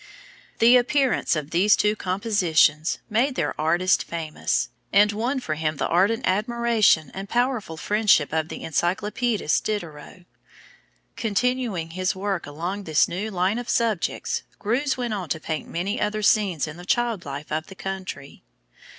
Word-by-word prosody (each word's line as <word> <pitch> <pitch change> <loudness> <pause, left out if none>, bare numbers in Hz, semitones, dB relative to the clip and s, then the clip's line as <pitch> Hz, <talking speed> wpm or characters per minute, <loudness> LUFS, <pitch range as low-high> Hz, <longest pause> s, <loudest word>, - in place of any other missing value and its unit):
The 240 +2 +7
appearance 260 - +1
of 155 -1 -4
these 195 +5 +4
two 210 0 +1
compositions 180 -6 +1
made 245 +5 +1
their - - -1
artist 175 +4 +2
famous, 160 -2 -2 0.2
and 205 +1 +5
won 240 +6 -1
for 160 -11 -3
him 155 -1 -2
the - - -1
ardent 210 +8 +2
admiration 215 - +2
and 195 +1 -7
powerful 240 -9 -1
friendship 205 -6 +2
of 160 0 0
the - - -7
encyclopædist 195 +4 0
Diderot. 175 -3 -5 0.9
Continuing 225 -6 -1
his 185 +2 -1
work 195 -3 -3
along 175 +7 -5
this 155 -2 +3
new 200 +5 -4
line 190 +3 0
of 245 - -7
subjects, 225 -7 0 0.2
Greuze 260 +7 0
went 240 -3 -2
on 185 -6 -4
to 160 - -1
paint 155 0 -4
many 195 +7 -2
other 210 0 -1
scenes 195 -9 +2
in 155 +2 -8
the 175 - -10
child 235 -2 0
life 140 +2 -7
of 155 +1 -2
the 190 - -11
country. 190 -8 -7
195 Hz, 150 wpm, -24 LUFS, 165-225 Hz, 0.9 s, The